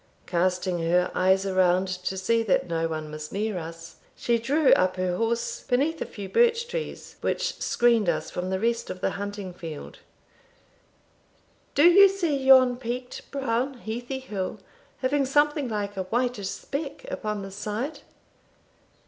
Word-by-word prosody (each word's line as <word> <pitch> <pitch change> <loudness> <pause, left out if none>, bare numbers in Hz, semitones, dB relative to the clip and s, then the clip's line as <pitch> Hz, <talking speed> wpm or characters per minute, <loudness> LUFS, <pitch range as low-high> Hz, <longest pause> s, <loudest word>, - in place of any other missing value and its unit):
Casting 180 0 0
her 175 +2 +2
eyes 190 +1 +3
around, 185 -1 +3
to 185 +1 -3
see 230 +5 +2
that 210 -5 +1
no 165 -1 0
one 155 -1 -5
was 155 0 -7
near 210 -2 -2
us, 165 0 -9 0.2
she 235 -1 +1
drew 280 +5 +4
up 185 0 +3
her 185 -1 -1
horse 235 - -1
beneath 290 +6 0
a - - -2
few 200 -2 -7
birch 470 - +3
trees, 480 -1 -6
which - - -2
screened 235 -5 +3
us 155 -2 -2
from 180 +1 -3
the 190 0 -1
rest 230 +2 0
of 185 - -5
the - - +1
hunting 205 -2 -5
field 165 -4 -8 1.8
"Do 290 - +5
you 390 +3 +8
see 355 -6 0
yon 260 -2 +6
peaked, 250 +1 -6
brown, 265 0 -1
heathy 240 +3 -5
hill, 210 -7 -4 0.5
having 275 +2 +2
something 290 -1 +2
like 205 -2 -3
a 190 -1 -3
whitish 235 -1 -1
speck 280 0 -5
upon 210 -1 -3
the 195 - -7
side?" 215 +9 -4
215 Hz, 155 wpm, -26 LUFS, 185-265 Hz, 1.8 s, you